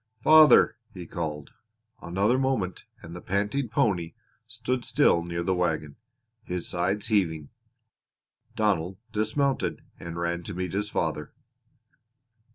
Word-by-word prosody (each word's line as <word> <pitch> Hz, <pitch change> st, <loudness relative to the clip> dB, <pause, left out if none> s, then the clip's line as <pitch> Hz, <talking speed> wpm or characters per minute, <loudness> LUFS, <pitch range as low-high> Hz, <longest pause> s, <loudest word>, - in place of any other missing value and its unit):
"Father!" 155 Hz, -7 st, +7 dB, 0.2 s
he 90 Hz, -2 st, -7 dB
called. 75 Hz, -3 st, -5 dB, 0.5 s
Another 100 Hz, +9 st, +1 dB
moment 130 Hz, -9 st, -1 dB, 0.2 s
and 85 Hz, +1 st, -9 dB
the 90 Hz, -, -8 dB
panting 105 Hz, +7 st, -1 dB
pony 95 Hz, -7 st, 0 dB, 0.3 s
stood 120 Hz, +2 st, -3 dB
still 85 Hz, -, +3 dB
near 85 Hz, 0 st, -3 dB
the 95 Hz, +2 st, +1 dB
wagon, 80 Hz, -5 st, -1 dB, 0.5 s
his 90 Hz, -5 st, -4 dB
sides 95 Hz, +5 st, -1 dB
heaving. 80 Hz, -8 st, 0 dB, 1.1 s
Donald 95 Hz, -4 st, 0 dB
dismounted 110 Hz, +6 st, -1 dB, 0.2 s
and 85 Hz, 0 st, -7 dB
ran 85 Hz, 0 st, -2 dB
to 90 Hz, +2 st, -7 dB
meet 90 Hz, -1 st, -4 dB
his 105 Hz, +1 st, -2 dB
father. 80 Hz, -5 st, -2 dB
95 Hz, 120 wpm, -26 LUFS, 85-110 Hz, 1.1 s, Father